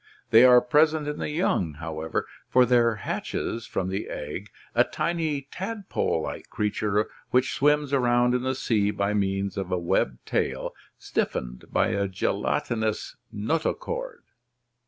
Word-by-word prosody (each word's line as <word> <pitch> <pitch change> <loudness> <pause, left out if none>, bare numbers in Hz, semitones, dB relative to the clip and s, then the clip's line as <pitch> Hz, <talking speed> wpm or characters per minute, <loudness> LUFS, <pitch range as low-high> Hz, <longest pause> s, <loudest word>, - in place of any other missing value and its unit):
They 115 +2 +8
are 125 -1 +8
present 155 0 +3
in 150 0 -3
the - - -2
young, 150 - 0
however, 80 0 -3 0.2
for 125 -1 +5
there 120 -2 +4
hatches 110 +2 -3
from 95 - -2
the 95 +2 -3
egg 80 +8 -5 0.2
a - - +5
tiny 160 -4 -1
tadpole 195 - -2
like - - -6
creature 105 0 0 0.2
which 125 +1 +2
swims 150 0 +2
around 125 -2 +3
in 125 - +1
the 130 +1 -1
sea 105 -5 +1
by 100 0 0
means 100 -1 -1
of 95 -2 -3
a 90 - +2
webbed 85 -7 0
tail - - -1 0.2
stiffened 60 0 -3
by - - +2
a 100 0 0
gelatinous 110 +3 -1 0.2
notochord. 475 - -2
115 Hz, 140 wpm, -26 LUFS, 100-150 Hz, 0.2 s, They